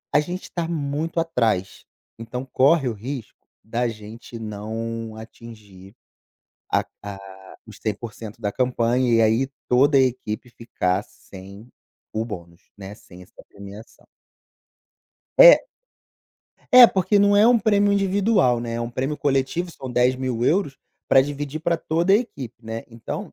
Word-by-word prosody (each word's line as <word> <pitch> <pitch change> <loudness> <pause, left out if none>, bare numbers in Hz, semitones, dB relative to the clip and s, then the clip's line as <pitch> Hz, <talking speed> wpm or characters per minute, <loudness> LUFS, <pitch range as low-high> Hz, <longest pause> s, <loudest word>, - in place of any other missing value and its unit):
a - - +7
gente 180 +4 -6
tá 170 -2 -3
muito 155 +1 -3
atrás, 115 - -1 0.3
então, 115 +3 -6
corre 135 +2 +3
o 120 - -1
risco 115 +1 -8 0.2
da 120 +2 -2
gente 115 +2 -9
não 110 +1 -6
atingir 110 -4 -13 0.8
a - - +1 0.2
a 100 -1 -7 0.5
os 110 - -12
100% 110 0 -6
da 105 -3 -2
campanha 125 +1 0
e 115 - +4
aí 115 +5 +2 0.2
toda 140 +3 +4
a - - +5
equipe 125 -2 -2
ficar 95 -5 -2
sem 100 -1 -14 0.5
o 110 - -1
bônus, 85 -6 -9 0.2
né, 100 0 -9
sem 90 -3 -15
essa 90 - -17
premiação. 100 +3 -13 2.7
É. 250 - +9
É, - - +12
porque 195 0 +1
não 205 0 +4
é 210 +2 +6
um 240 0 +5
prêmio 205 -1 +2
individual, 195 - +2
né, 115 -1 -5
é 115 - -3
um 120 0 -4
prêmio 135 +5 -3
coletivo, 140 +6 -1
são 130 -5 -9
10.000€ 130 - 0 0.3
pra 135 - +6
dividir 145 +2 -4
pra 170 +1 0
toda 170 +4 0
a - - +7
equipe, 135 - -6
né. 115 0 -6
Então, 115 - -7
125 Hz, 140 wpm, -22 LUFS, 110-150 Hz, 2.7 s, É